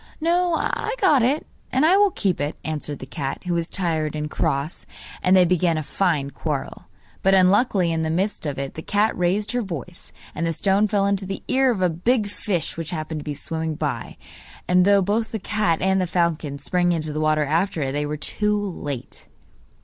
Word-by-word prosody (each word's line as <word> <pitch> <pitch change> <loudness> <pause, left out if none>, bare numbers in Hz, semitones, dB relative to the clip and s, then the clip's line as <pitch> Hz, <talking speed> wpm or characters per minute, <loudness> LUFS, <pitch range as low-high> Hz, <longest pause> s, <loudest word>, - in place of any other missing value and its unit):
'No, 345 +1 +2
I 445 +7 -1
got 305 - +5
it, 270 +6 +1 0.3
and 265 +4 +3
I 350 +4 +6
will 405 0 +5
keep 195 - -1
it,' 145 +2 -2
answered 150 -2 -3
the 130 - -8
cat, 135 0 -5
who 180 - -1
was 170 -1 0
tired 160 -6 -1
and 150 0 -4
cross; 140 +4 -2 0.3
and 185 +1 +4
they 185 -1 +6
began 175 -1 +2
a 155 - -2
fine 150 -5 0
quarrel. 150 -3 -4 0.4
But, 195 0 +4
unluckily, 190 -1 +3
in 165 0 0
the 160 - -1
midst 180 0 -1
of 140 - -3
it, 135 0 -4
the 160 - -6
cat 210 +5 +1
raised 185 +4 0
her 245 0 0
voice, 175 - -7 0.2
and 165 +2 -2
the 165 - 0
stone 200 +5 +2
fell 200 -1 +1
into 200 -1 0
the 195 - -5
ear 265 0 +3
of 195 -6 -1
a - - +5
big 215 +7 +1
fish 200 -5 -3
which 165 -2 -4
happened 155 -2 -4
to - - -8
be 150 -2 -3
swimming 160 +1 -3
by, - - -4 0.5
and 180 0 +4
though 200 -1 +5
both 215 +4 0
the 220 - -2
cat 210 -4 0
and 190 0 +3
the 180 - 0
falcon 170 -5 0
sprang 175 +5 +1
into 155 -2 -2
the 155 - -2
water 155 -1 +2
after 165 +2 0
it, 135 - -2
they 145 +1 -1
were 150 +1 -3
too 210 +7 0
late. 150 -10 -6
180 Hz, 210 wpm, -23 LUFS, 155-205 Hz, 0.5 s, I